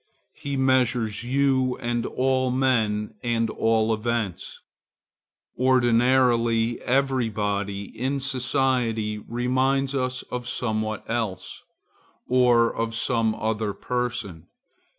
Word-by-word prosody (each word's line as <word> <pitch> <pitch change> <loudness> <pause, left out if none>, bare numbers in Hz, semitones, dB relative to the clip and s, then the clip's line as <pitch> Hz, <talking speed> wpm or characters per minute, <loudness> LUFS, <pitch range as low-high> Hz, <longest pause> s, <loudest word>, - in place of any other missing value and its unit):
He 140 -1 -5
measures 125 -4 +1
you 130 0 +1
and 120 0 -2
all 130 0 +1
men 115 -5 +1
and 115 -1 0
all 110 0 +1
events. 110 -4 -3 1.0
Ordinarily, 120 -2 +3
every 130 -2 +1
body 100 -1 -2
in 135 +3 -1
society 125 -5 0
reminds 130 +4 0
us 130 -1 -2
of 125 -1 -4
somewhat 110 -2 -2
else, 110 -6 -3 0.7
or 120 -2 +3
of 115 0 -2
some 115 -1 0
other 110 -1 -2
person. 120 -10 -4
120 Hz, 95 wpm, -24 LUFS, 110-130 Hz, 1.0 s, Ordinarily